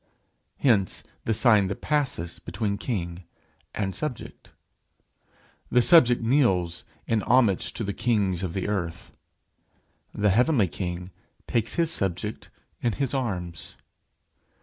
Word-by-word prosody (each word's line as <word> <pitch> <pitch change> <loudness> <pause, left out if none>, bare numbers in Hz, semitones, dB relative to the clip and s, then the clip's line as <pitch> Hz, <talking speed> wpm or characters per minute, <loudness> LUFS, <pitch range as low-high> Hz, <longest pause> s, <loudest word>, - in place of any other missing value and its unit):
Hence 105 -9 +1 0.2
the 110 - +1
sign 110 -4 +4
that 100 - -5
passes 130 - -1
between 100 +3 -3
king 85 -7 -4 0.5
and 95 -2 -2
subject. 150 -6 -6 1.2
The 125 -1 +4
subject 125 -8 +6
kneels 95 - +1 0.2
in 115 -2 +1
homage 115 -7 +3
to 115 - -4
the 100 -1 -3
kings 100 -6 0
of 90 -3 -3
the 95 - -2
earth: 85 -5 -3 1.0
the 105 -1 +1
heavenly 120 - +3
king 90 +2 -5 0.3
takes 115 -1 0
his 165 -1 +1
subject 100 - -3 0.3
in 120 - 0
his 135 +4 -2
arms. 90 - -4
105 Hz, 120 wpm, -26 LUFS, 90-120 Hz, 1.2 s, subject